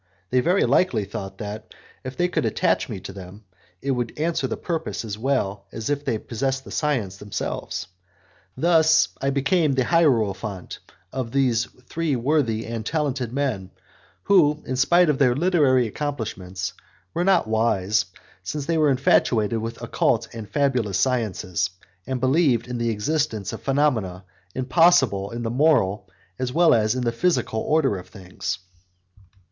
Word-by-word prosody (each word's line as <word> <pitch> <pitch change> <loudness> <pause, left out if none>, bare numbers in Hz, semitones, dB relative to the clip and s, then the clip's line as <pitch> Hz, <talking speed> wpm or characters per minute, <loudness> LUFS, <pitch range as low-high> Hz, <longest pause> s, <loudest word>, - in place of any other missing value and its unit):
They 125 - +4
very 175 +9 +3
likely 115 - +2
thought 95 0 -7
that, 105 +1 -7 0.3
if 130 0 -7
they 175 - +2
could 180 - -1
attach - - +1
me - - -5
to 95 - -8
them, 95 +2 -11 0.4
it 140 - 0
would 125 +1 -3
answer 165 +2 0
the - - -4
purpose 115 - -3
as 105 -2 -4
well 105 -5 -1
as 110 +5 -4
if 145 0 -1
they 115 - 0
possessed 135 +5 -2
the - - -11
science 120 -11 -1
themselves. 105 0 -4 0.7
Thus 160 +1 +4
I 135 - +1
became 140 +3 +2
the 130 -1 +2
hierophant 110 - +1 0.3
of 130 -3 -3
those 120 -3 +2 0.2
three 165 -4 -1
worthy 120 -3 0
and 115 -1 -4
talented 135 -3 -1
men, 125 -9 -2 0.5
who, 155 -6 +4
in 130 - -2
spite 170 +7 +4
of 150 -3 +1
their 125 -3 +4
literary 145 -6 +3
accomplishments, 100 -8 -4 0.4
were 175 - 0
not 185 -8 +3
wise, 110 -2 +1 0.4
since 135 +11 -4
they 165 +1 +1
were 150 -1 +4
infatuated 115 -4 +2
with 115 +1 -6
occult 115 0 +1
and 110 -3 -8
fabulous 125 -9 +1
sciences, 95 -8 0 0.4
and 130 -1 -2
believed 130 -2 +2
in 125 -1 -4
the 115 0 0
existence 110 -1 -1
of - - -7
phenomena 125 -10 0 0.3
impossible 130 - +3
in 120 0 -5
the 115 - -2
moral 115 -9 +2 0.3
as 130 -1 -1
well 170 +5 +5
as 110 0 +2
in 130 - -1
the 120 - +1
physical 120 -4 0
order 135 -7 +1
of 90 - -12
things. 95 -1 -5
125 Hz, 155 wpm, -23 LUFS, 105-145 Hz, 0.7 s, well